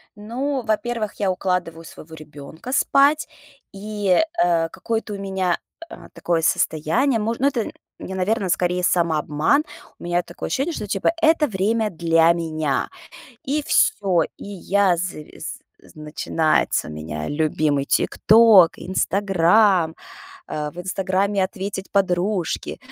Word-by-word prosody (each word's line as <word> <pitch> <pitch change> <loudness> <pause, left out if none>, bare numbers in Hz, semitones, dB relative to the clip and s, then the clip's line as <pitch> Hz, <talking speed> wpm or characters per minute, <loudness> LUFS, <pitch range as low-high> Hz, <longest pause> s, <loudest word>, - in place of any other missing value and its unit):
Ну, 255 +6 -3
во-первых, 220 -1 -2
я 195 -2 +1
укладываю 180 -3 -2
своего 160 0 -12
ребёнка 155 - -10
спать 285 +2 +3 0.5
и, 205 -2 0 0.2
э, 165 -2 +1
какое-то 220 +4 -4
у - - -5
меня, 190 -3 -1 0.3
э, - - -11
такое 170 -1 -1
состояние, 225 - +1
мож 225 +2 -2
ну 275 - +3
это, 240 -6 -2 0.3
я 190 - -7
наверно, 190 +1 -1
скорее 180 +1 0
самообман. 160 - +1 0.4
У - - -12
меня 175 0 0
такое 175 - -7
ощущение, 295 +6 -1
что 210 - -5
типа 195 +6 +1
это 320 -1 +4
время 215 +1 0
для 165 -2 +3
меня. 155 -4 -2 0.6
И 295 +3 -1
всё, 190 - +2
и - - -11
я 200 -1 +1
завис 170 -3 -6 0.2
з - - -19
начинается 155 - 0
у - - -7
меня 75 0 -6
любимый 150 -2 0
"Тикток", 215 -5 +5
"Инстаграм". 190 -1 +2 0.5
А, 150 -1 -4
в 170 - -19
"Инстаграме" 190 +2 0
ответить 195 0 -5
подружке, 185 -1 -1
185 Hz, 130 wpm, -22 LUFS, 165-215 Hz, 0.6 s, Тикток